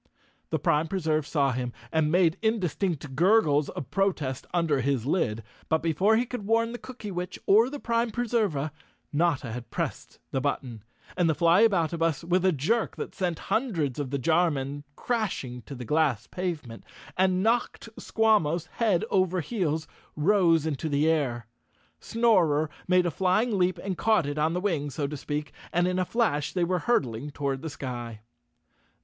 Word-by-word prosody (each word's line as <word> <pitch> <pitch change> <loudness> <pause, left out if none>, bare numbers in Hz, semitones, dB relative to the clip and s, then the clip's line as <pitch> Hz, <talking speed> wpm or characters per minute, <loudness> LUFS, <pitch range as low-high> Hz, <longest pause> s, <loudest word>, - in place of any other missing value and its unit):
The - - 0
Prime 150 +2 +1
Preserve 155 -5 -1
saw 140 -3 +1
him 125 -1 -3 0.2
and 155 -1 +2
made 175 -1 +4
indistinct 180 - -1
gurgles 155 -4 +3
of 130 - -7
protest 160 -10 -1
under 165 -6 +1
his 130 -2 0
lid, 115 - 0 0.3
but 160 0 +1
before 185 +7 +3
he 240 - +1
could 245 -3 -6
warn 230 +1 +2
the 240 - -6
Cookywitch 200 -8 -6
or 220 +5 +5
the 290 - -5
Prime 230 -1 0
Preserva, 215 - -1 0.4
Notta 145 -6 +1
had 120 +1 -7
pressed - - -4
the 135 - -1
button, 125 -5 -3 0.3
and 175 -2 +2
the 160 - +2
Flyaboutabus, 170 -3 +3
with 180 +2 +1
a 190 - +4
jerk 200 - 0
that - - -6
sent 175 -4 -2 0.2
hundreds 170 - 0
of 140 -3 -3
the 140 - -1
jar 165 +6 +3
men 140 0 -4
crashing 195 - -2
to 140 - -7
the 125 -1 -7
glass 140 -5 +1
pavement 155 -11 -5 0.3
and 185 0 +2
knocked 230 +1 0
Squawmos 180 -8 +2
head 215 -4 +2
over 185 -1 +2
heels, 160 -4 -2 0.3
rose 165 -1 +3
into 155 0 -2
the 145 +2 +2
air. 135 -8 0 0.5
Snorer 175 -11 +2 0.2
made 180 0 +4
a 175 - 0
flying 195 +7 +1
leap 185 -1 +1
and 190 -2 -4
caught 220 -7 +3
it 145 +1 -3
on 155 +2 +2
the 180 - -1
wing, 160 -8 -1
so 145 +1 -3
to 145 +2 -4
speak, 145 +1 -4 0.2
and 175 +1 +2
in 185 0 0
a 185 - +1
flash 175 - 0
they 180 - +1
were 180 +1 +1
hurtling 140 - 0
toward 140 -2 -3
the 160 - -4
sky. 120 -6 -6
165 Hz, 170 wpm, -27 LUFS, 145-195 Hz, 0.5 s, or